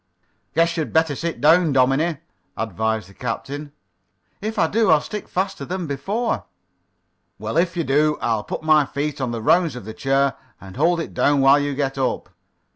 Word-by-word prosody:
"Guess 165 +1 +2
you'd 160 - -2
better 160 -2 +3
sit 165 +4 -4
down, 160 +2 +5
dominie," 135 +5 +2 0.4
advised 110 -1 -2
the 100 - -16
captain. 140 +6 -5 0.7
"If 215 +2 -4
I - - +4
do, 215 +4 +1
I'll 155 -2 +6
stick 210 +6 -6
faster 190 -5 -2
than 180 +4 -4
before." 200 - -2 0.9
"Well, 110 +4 -5
if 170 +1 +1
you 170 - +1
do 150 +2 +2
I'll 110 -2 0
put - - -5
my 155 -1 +5
feet 145 +1 -3
on 130 - -1
the 115 -2 -4
rounds 165 0 +3
of 125 - -8
the 110 - -7
chair 135 +2 +1 0.3
and 95 0 -12
hold 170 +5 +2
it - - -7
down 145 -1 +2
while 135 +2 +6
you 145 -1 -2
get 135 -1 -2
up. 130 - -1
145 Hz, 185 wpm, -22 LUFS, 130-165 Hz, 0.9 s, I'll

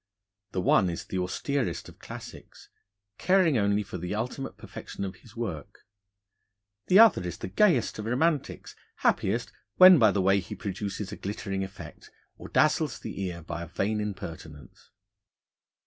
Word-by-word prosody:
The 90 - -1
one 90 +1 +3
is 85 - -5
the 95 - -3
austerest 130 +9 -2
of - - -15
Classics, - - -11 0.5
caring 180 -9 +3
only 100 0 +1
for 95 -2 -7
the 90 +4 -4
ultimate 125 +5 -4
perfection 100 - -7
of 95 -1 -7
his 115 +3 -18
work. 95 -11 -6 1.0
The 185 - +5
other 225 - +7
is 90 -2 -5
the - - -6
gayest 125 - +2
of 105 - -5
Romantics, 140 +6 -1 0.3
happiest 115 +5 +1 0.2
when 185 -3 +9
by 110 -3 +6
the 100 - 0
way 95 +1 +4
he 90 - -7
produces 100 0 -5
a 105 - -7
glittering 100 -1 -4
effect, 95 +1 -10 0.3
or - - -8
dazzles - - +2
the - - -7
ear 85 -2 -6
by 85 +1 -5
a 85 - -6
vain 100 +5 -1
impertinence. 80 -7 -8
100 Hz, 155 wpm, -27 LUFS, 90-120 Hz, 1.0 s, when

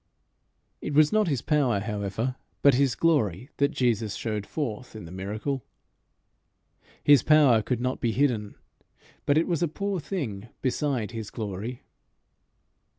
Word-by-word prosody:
It 145 - -4
was 155 +3 +5
not 215 -2 +3
his 140 -7 -1
power, 135 -9 +2
however, 105 +4 -2 0.3
but 140 - +7
his 135 0 +2
glory, 130 - +1
that 140 0 +3
Jesus 115 -7 0
showed 105 -3 -3
forth 125 -6 -4
in 105 - -8
the 85 - -10
miracle. 105 +8 -3 1.4
His 145 -4 +7
power 145 -7 +5
could 125 +2 -2
not 125 +1 -2
be 120 - +1
hidden, 115 -5 0 0.7
but 145 - +4
it 160 - +3
was 170 -3 -1
a 170 - +3
poor 200 +4 -2
thing 125 - -4 0.2
beside 130 -4 0
his 115 -3 -6
glory. 110 +3 -5
125 Hz, 145 wpm, -27 LUFS, 105-145 Hz, 1.4 s, but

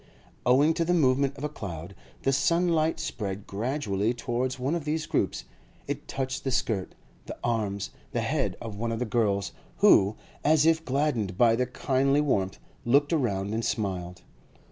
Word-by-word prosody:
Owing 140 +6 +5
to 165 +1 0
the 175 +2 +2
movement 140 -2 +2
of 135 - -8
a - - +1
cloud, 90 - -7 0.3
the 135 - +2
sunlight 165 +2 +2
spread 100 -3 -4
gradually 110 -1 -1
towards 120 +2 -2
one 130 +4 -1
of 170 -3 -1
these 155 +1 -1
groups; - - -1 0.4
it - - -4
touched 130 -1 -3
the 135 - -1
skirt, 110 -7 -1 0.3
the - - -6
arms, 105 -4 -1 0.2
the - - -1
head - - -1
of 110 -3 -6
one 115 +3 -2
of 115 - -1
the 125 - -1
girls, 105 -4 0 0.3
who, 100 +2 +5 0.3
as 155 0 +4
if 160 0 +3
gladdened 130 -9 0
by 115 0 +5
the 125 +1 0
kindly 135 +2 +1
warmth, 100 -11 0 0.3
looked 140 +4 +3
round 105 - 0
and 115 +1 -1
smiled. 90 -5 -3
125 Hz, 165 wpm, -27 LUFS, 100-145 Hz, 0.4 s, Owing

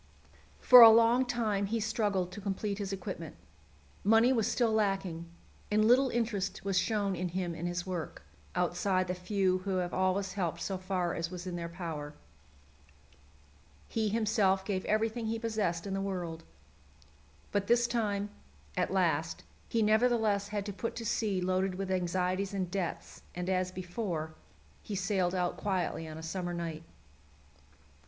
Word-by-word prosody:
For 250 -1 +9
a 230 - +13
long 230 +3 +5
time 215 -5 0
he 225 +3 -1
struggled 205 -4 0
to 205 - -8
complete 200 +1 -2
his 200 -1 -3
equipment. 195 - -6 0.7
Money 225 +4 +5
was 225 -4 +1
still 235 -3 +2
lacking, 195 -6 -1 0.4
and 215 +1 +3
little 255 +4 +5
interest 215 -6 -2
was 195 -1 0
shown 200 0 0
in 180 +1 -2
him 175 -1 -2
and 165 +1 -4
his 175 0 -3
work, 180 -4 -5 0.3
outside 185 +1 +1
the 180 - -1
few 185 0 0
who 190 0 -2
have 180 -1 -1
always 185 0 0
helped 175 -4 -2
so 190 +2 -3
far 185 -2 -1
as 165 0 -3
was 180 0 -7
in 180 -1 -4
their 170 -1 -4
power. 160 -4 -6 1.7
He 220 -2 0
himself 205 -3 +2
gave 190 -2 -1
everything 220 +2 0
he 225 +1 -1
possessed 215 -7 -1
in 195 - -3
the 195 - -1
world. 175 -4 -4 1.1
But 200 -1 0
this 240 0 +4
time, 210 -4 -1 0.4
as - - 0
last, 165 -4 0 0.3
he 225 -1 +2
nevertheless 220 -2 +2
had 205 -1 -3
to 205 - -4
put 230 +4 -4
to 230 - -5
sea 210 -4 0
loaded 185 +1 0
with 190 0 -3
anxieties 185 +2 -1
and 185 -2 -2
debts, 185 -3 -4
and, 180 0 -4
as 185 0 +1
before, 180 -3 -4 0.5
he 205 - -5
sailed 190 -2 0
out 180 -1 -1
quietly 185 -4 -2
on 155 0 -8
a 160 - -8
summer 175 +1 -3
night. 165 -2 -4
195 Hz, 160 wpm, -31 LUFS, 180-215 Hz, 1.7 s, a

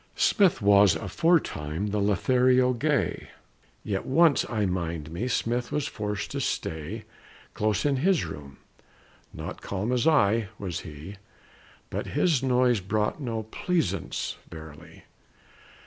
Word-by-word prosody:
Smith 190 - +3
was 100 -1 +6
aforetime 100 - 0
the 105 - 0
Lothario 125 +5 +3
gay. 145 +4 -1 0.5
Yet 95 -2 -2
once, 160 +2 +4
I 110 -4 0
mind 85 -4 -3
me, 95 +9 -3
Smith 120 -1 -1
was 150 -1 -1
forced 105 -5 -4
to - - -3
stay 80 +8 -3 0.5
Close 105 +2 0
in 140 -2 +2
his 180 +5 +2
room. 70 -1 -9 0.7
Not - - -7
calm, 100 +4 -3
as 125 +4 +1
I, 115 -8 +3
was 90 -3 -4
he; 80 +5 -9 0.7
But - - -3
his 160 -8 +3
noise 125 -3 +3
brought 105 - -1
no 115 -4 -3
pleasaunce, 100 - -2
verily. 80 -2 -12
110 Hz, 125 wpm, -27 LUFS, 95-130 Hz, 0.7 s, was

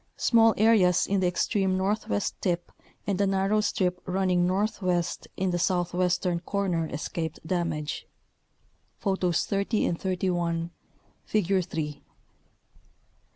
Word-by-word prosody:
Small 225 -1 +4
areas 205 -5 +4
in 200 0 +1
the 185 - +2
extreme 190 +1 +1
northwest 190 - -1
tip 175 -2 -1 0.3
and 200 -1 0
a 200 - +3
narrow 195 +2 +2
strip 180 -3 0
running 180 -1 +2
northwest 185 -3 -1
in 190 -1 0
the 175 - -1
south 175 -1 0
western 180 0 +1
corner 180 -3 -1
escaped 160 +1 -4
damage 160 -4 -2 0.9
(Photos 190 -4 0
30 200 +2 0
and 170 - -2
31, 175 -3 -1 0.5
Figure 195 -2 +1
3). 150 -4 -4
180 Hz, 115 wpm, -27 LUFS, 175-195 Hz, 0.9 s, Small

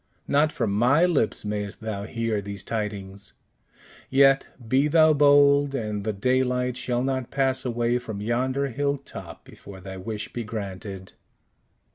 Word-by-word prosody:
"Not 150 +2 +3
from 115 -5 -1
my 125 - +4
lips 145 -12 0
mayst 105 -1 -4
thou 105 -2 -4
hear 115 -2 -2
these 100 0 -7
tidings; 100 -3 -5 0.8
yet, 135 0 +4 0.2
be 135 +5 +3
thou 155 0 +5
bold, 145 -1 +5
and 105 -5 -3
the 110 - -1
daylight 125 +3 0
shall 125 -1 -1
not 130 -2 -2
pass 135 -1 0
away 120 0 0
from 110 -4 -7
yonder 130 +5 0
hill 140 +3 -1
top 140 - -10
before 95 -1 -12
thy 95 +1 -8
wish 105 +2 -6
be 120 - -3
granted." 100 -3 -7
120 Hz, 145 wpm, -25 LUFS, 105-135 Hz, 0.8 s, thou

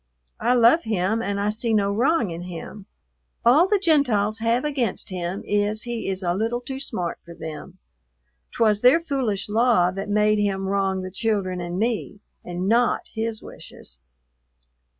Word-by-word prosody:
I 245 +2 +2
love 240 +7 +5
him 220 - 0
and 200 -3 -2
I 205 +1 +1
see 225 +1 -1
no 200 -1 +2
wrong 240 - +1
in 165 +1 -6
him. 180 +3 -8 0.6
All 290 +10 +6
the 415 +1 +3
Gentiles 250 - +2
have 230 +4 +1
against 260 -10 -2
him 180 +1 -4
is 205 +1 0
he 240 -4 -4
is 190 0 -3
a 175 -1 +1
little 225 +5 -1
too 265 +2 -7
smart 185 -11 -4
for 170 0 -12
them. 155 -3 -8 0.8
'T - - +3
was 210 -2 +3
their 255 +6 +6
foolish 260 -11 -2
law 220 -4 +3
that 195 +2 -5
made 210 0 +3
him 195 -2 0
wrong 195 -1 0
the 185 - -6
children 190 -3 -1
and 175 +1 -4
me, 220 -1 -2 0.2
and 180 +1 -4
not 235 +3 +2
his 225 -1 -3
wishes." 60 0 -12
210 Hz, 170 wpm, -23 LUFS, 190-235 Hz, 0.8 s, All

